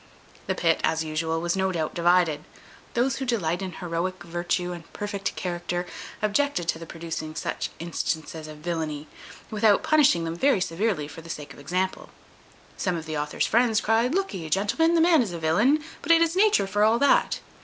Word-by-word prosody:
The 190 - 0
pit, 165 -2 +2
as 160 0 +1
usual, 160 +1 -1
was 175 +1 0
no 190 0 +1
doubt 160 -4 -2
divided; 170 -3 +3 0.5
those 240 +1 +1
who 270 - -3
delight 180 -8 0
in 185 -2 -4
heroic 175 +1 -3
virtue 175 +1 -2
and 170 -2 -9
perfect 205 -1 -3
character 175 0 -3 0.4
objected 215 -4 +1
to 160 - 0
the 165 - -9
producing 160 -1 -6
such - - -3
instances 160 -1 -3
of 155 0 -9
villany, 155 -2 -3 0.4
without 215 -1 +3
punishing 295 - +4
them 165 0 -3
very 270 +3 +3
severely 180 -2 -1
for 165 - -10
the 165 - -13
sake 150 -2 -6
of - - -15
example. 185 +6 -2 0.7
Some 185 -3 0
of 160 - -6
the 155 -1 -4
author's 150 0 -1
friends 230 -1 +3
cryed, 230 +7 +2
"Look'e, 195 - -2
gentlemen, 210 - +2
the 330 - +4
man 330 -3 +5
is 205 -7 -2
a - - -4
villain, 215 - +3 0.2
but - - +1
it 335 0 +7
is 335 +1 0
nature 415 - +4
for 205 +2 +1
all 220 +2 +4
that." 285 - +3
180 Hz, 185 wpm, -26 LUFS, 165-225 Hz, 0.7 s, it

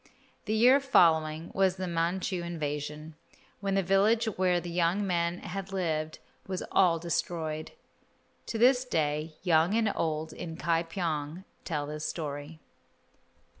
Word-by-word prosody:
The 215 0 0
year 250 +5 +6
following 160 - +3
was 190 -1 +2
the 185 -1 -4
Manchu 175 +2 -1
invasion, 150 -2 -4 0.5
when 195 -1 -1
the 195 - +2
village 205 +5 +3
where 185 -4 +1
the 175 0 -7
young 175 +4 +1
man 170 -2 0
had 195 +1 -6
lived 160 -5 -2 0.3
was 185 -1 -3
all 175 -3 +4
destroyed. 160 -2 -3 0.7
To 230 - -3
this 250 +2 +5
day 155 - -1
young 170 +2 +3
and 220 -2 +2
old 160 -1 -2
in 165 -2 -7
Ka 165 -1 +1
pyong 165 -1 -3 0.2
tell 150 -4 -2
this 150 +1 -6
story. 150 0 -5
170 Hz, 135 wpm, -29 LUFS, 155-195 Hz, 0.7 s, year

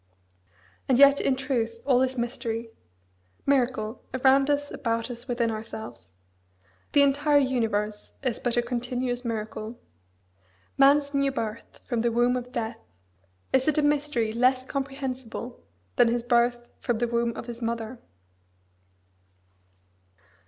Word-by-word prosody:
and 255 - +4
yet 280 +1 +7
in 270 - +2
truth 245 -4 -1
all 255 -3 +4
is 260 0 0
mystery, 235 -1 -3 0.7
miracle, 250 -4 +1
around 270 +2 +4
us, 290 0 0
about 230 0 -2
us, 240 +1 -8
within 240 -2 0
ourselves. 215 - -8 0.8
The 285 - +6
entire 290 +1 +3
universe 225 -6 0
is 255 -4 -1
but 245 -1 -1
a 240 - +3
continuous 245 +1 -2
miracle. 220 0 -4 1.0
Man's 280 +1 +4
new 275 -1 +2
birth 225 -3 -5
from 235 -2 -1
the 235 0 +1
womb 240 +2 +3
of 250 0 -4
death 230 -3 -3 0.7
is 265 +1 +3
it 310 - +2
a 300 - +3
mystery 290 -6 +1
less 255 +2 +2
comprehensible 265 -3 -5 0.4
than - - +6
his 235 0 0
birth 240 0 +2
from 240 -3 -1
the 240 +1 0
womb 235 0 0
of - - -6
his 240 0 -8
mother? 230 +1 -3
245 Hz, 130 wpm, -26 LUFS, 230-270 Hz, 1.0 s, yet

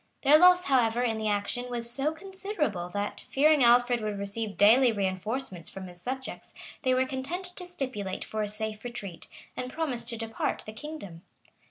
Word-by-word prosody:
Their 295 +2 +7
loss, 360 +1 +7
however, 245 -4 +2
in 225 -3 0
the 215 - -1
action, 210 +4 -1
was 235 -1 -3
so 270 +5 0
considerable, 320 - -3
that, 205 +3 -3
fearing 295 0 +4
Alfred 245 0 +5
would 210 -1 -2
receive 200 +1 -4
daily 235 +5 +6
reënforcements 195 0 -3
from 190 -1 -8
his 175 -1 -11
subjects, 260 +3 -6 0.3
they 255 -2 +2
were 260 +1 +3
content 270 +8 -3
to 360 - -4
stipulate 255 - -4
for 220 - -3
a 210 - 0
safe 215 +1 -4
retreat, 210 -8 -6 0.3
and 250 0 -4
promised 255 -8 -2
to 230 - -3
depart 225 0 -2
the 215 - -7
kingdom. 220 - -8
235 Hz, 175 wpm, -28 LUFS, 210-270 Hz, 0.3 s, Their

